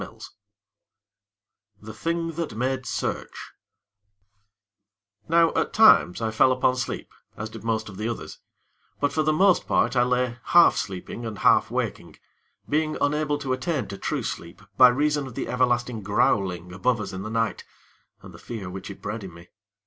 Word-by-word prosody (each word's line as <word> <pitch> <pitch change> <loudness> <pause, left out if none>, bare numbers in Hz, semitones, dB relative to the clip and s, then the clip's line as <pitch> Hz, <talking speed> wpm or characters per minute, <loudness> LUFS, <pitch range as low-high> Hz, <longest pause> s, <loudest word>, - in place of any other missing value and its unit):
III - - -9 1.6
The 110 +1 -10
Thing 165 +7 -2
That 165 -8 -5
Made 130 +1 -2
Search - - -4 1.8
Now 165 0 +4
at - - -1
times, 115 - +5
I 110 - 0
fell 110 +4 +4
upon 130 0 +2
sleep, 130 - -5 0.2
as 110 0 -6
did 115 -1 -10
most 110 -1 -1
of 100 -3 -10
the 110 +3 -2
others; 115 - -7 0.6
but, 145 - 0
for 155 - +1
the 155 0 +2
most 185 +4 +3
part, - - +1
I 120 - +4
lay 125 0 0
half 175 0 +6
sleeping 95 +4 -5
and 110 -3 -5
half - - +4
waking - - -4 0.5
being 155 +1 0
unable 150 0 0
to 135 -3 -2
attain 145 +3 -2
to 100 - -6
true - - -2
sleep 85 +3 -6
by 125 - +8
reason 145 +2 +1
of 125 - -11
the - - -3
everlasting 120 -2 0
growling 95 -3 0
above 115 +6 0
us 105 - -5
in 95 - -5
the 105 - -5
night, 115 -1 -1 0.6
and - - -12
the - - -13
fear 100 -6 -7
which 95 +2 -7
it 100 - -11
bred 105 +1 -4
in 95 - -8
me. 85 +1 -15
120 Hz, 170 wpm, -25 LUFS, 105-145 Hz, 1.8 s, by